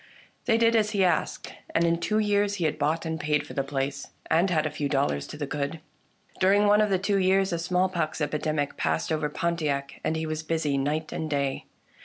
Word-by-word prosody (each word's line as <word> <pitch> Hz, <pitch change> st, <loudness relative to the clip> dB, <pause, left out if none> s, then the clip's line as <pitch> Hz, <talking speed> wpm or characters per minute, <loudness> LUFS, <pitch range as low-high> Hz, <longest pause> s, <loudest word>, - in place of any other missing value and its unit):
They 225 Hz, -2 st, +3 dB
did 230 Hz, 0 st, +4 dB
as 215 Hz, -1 st, +2 dB
he 195 Hz, -, +4 dB
asked, 180 Hz, -, 0 dB, 0.2 s
and 165 Hz, -, +4 dB
in 170 Hz, 0 st, +2 dB
two 215 Hz, +5 st, 0 dB
years 205 Hz, -1 st, +2 dB
he 175 Hz, -5 st, -1 dB
had 155 Hz, -, -1 dB
bought 155 Hz, +3 st, 0 dB
and 160 Hz, 0 st, -3 dB
paid 150 Hz, -1 st, 0 dB
for -, -, -9 dB
the 140 Hz, -, 0 dB
place, 140 Hz, 0 st, -3 dB, 0.2 s
and 170 Hz, +4 st, +4 dB
had 155 Hz, -3 st, +1 dB
a 155 Hz, -, -1 dB
few 145 Hz, -1 st, -2 dB
dollars 135 Hz, -, 0 dB
to -, -, -8 dB
the 145 Hz, -, -3 dB
good. 145 Hz, +3 st, -3 dB, 0.6 s
During 200 Hz, +2 st, +4 dB
one 205 Hz, +1 st, +5 dB
of 210 Hz, -, +2 dB
the 190 Hz, -, +3 dB
two 200 Hz, +1 st, +1 dB
years 190 Hz, 0 st, +2 dB
a 170 Hz, -, -1 dB
smallpox 180 Hz, -2 st, 0 dB
epidemic 150 Hz, -1 st, -1 dB
passed 80 Hz, 0 st, -1 dB
over 155 Hz, -1 st, 0 dB
Pontiac, 150 Hz, -4 st, -2 dB
and 160 Hz, -, 0 dB
he 160 Hz, 0 st, -2 dB
was 155 Hz, 0 st, -3 dB
busy 160 Hz, -3 st, -1 dB
night 150 Hz, +3 st, -1 dB
and 160 Hz, -, -3 dB
day. 140 Hz, -2 st, -1 dB
160 Hz, 220 wpm, -27 LUFS, 145-190 Hz, 0.6 s, one